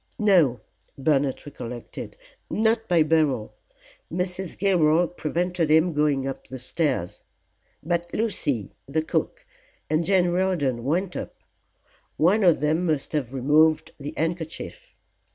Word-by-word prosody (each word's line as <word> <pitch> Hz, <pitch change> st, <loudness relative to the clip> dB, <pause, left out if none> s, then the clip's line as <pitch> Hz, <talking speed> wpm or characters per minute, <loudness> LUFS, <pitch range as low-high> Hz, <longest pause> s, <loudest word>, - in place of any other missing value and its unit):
No," 175 Hz, -, +3 dB, 0.4 s
Bernard 140 Hz, -1 st, +1 dB
recollected, 120 Hz, -4 st, -8 dB, 0.3 s
"not 225 Hz, +1 st, +1 dB
by 170 Hz, -3 st, +4 dB
Beryl; 150 Hz, -8 st, +1 dB, 0.6 s
Mrs. 180 Hz, +1 st, -3 dB
Gilroy 175 Hz, -3 st, +3 dB
prevented 175 Hz, 0 st, -1 dB
him 160 Hz, +2 st, +4 dB
going 145 Hz, -3 st, +1 dB
up 135 Hz, -1 st, -5 dB
the 130 Hz, -, -7 dB
stairs. 130 Hz, -, -2 dB, 0.6 s
But 170 Hz, +1 st, -1 dB
Lucy, 145 Hz, -, -1 dB, 0.2 s
the 155 Hz, +3 st, 0 dB
cook -, -, -2 dB, 0.5 s
and 155 Hz, +2 st, +2 dB
Jane 180 Hz, 0 st, +3 dB
Riordan 175 Hz, -10 st, 0 dB
went 175 Hz, +6 st, 0 dB
up; -, -, -5 dB, 0.8 s
one 195 Hz, +7 st, +3 dB
of 175 Hz, -5 st, +4 dB
them 155 Hz, +3 st, +1 dB
must 155 Hz, -4 st, -1 dB
have 140 Hz, -6 st, -2 dB
removed 150 Hz, +4 st, +3 dB
the 145 Hz, +1 st, -6 dB
handkerchief. 165 Hz, 0 st, -4 dB
160 Hz, 120 wpm, -25 LUFS, 140-180 Hz, 0.8 s, by